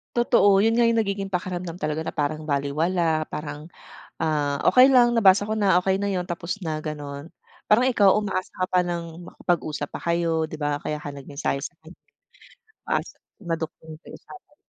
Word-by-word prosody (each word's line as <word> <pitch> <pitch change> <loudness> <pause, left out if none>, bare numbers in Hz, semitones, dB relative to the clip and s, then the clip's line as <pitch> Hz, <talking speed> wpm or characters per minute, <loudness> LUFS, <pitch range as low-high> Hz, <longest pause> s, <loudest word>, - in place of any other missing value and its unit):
Totoo. 205 -5 +4
Yun 225 +2 +3
nga 240 - +4
yung 230 -1 +2
nagiging 195 -2 -2
pakiramdam 180 -1 -4
talaga 155 +1 -2
na - - -4
parang 155 +1 -2
balewala, 155 +3 0
parang, 150 +2 -7 0.5
ah, 145 -2 0 0.2
okey 255 +1 +7
lang 245 -3 +5
nabasa 205 -4 +5
ko 215 - -5
na 195 -3 +3
okey 190 0 +1
na 200 - -1
yun 185 -2 -1
tapos 175 +2 -4
na 155 -1 -2
ganon. 145 -1 -6 0.4
Parang 220 +4 +4
ikaw 200 -4 +5
umaasa 200 -3 -2
ka 185 - 0
pa 180 - +4
ng 170 -1 -5
makapag-usap 155 -4 -2
pa - - -6
kayo 165 -2 0
di 155 - -7
ba? 145 -1 -2
Kaya 150 - -3
ka 145 - -5
nag-mensahe 140 0 -4
sa 175 - -7
kan 160 - -13 1.0
umaasa - - -2 0.2
na - - -14
madugtongan 160 -1 -5
pa - - -29
yung - - -10
usapan. 305 -5 -15
170 Hz, 185 wpm, -24 LUFS, 155-195 Hz, 1.0 s, okey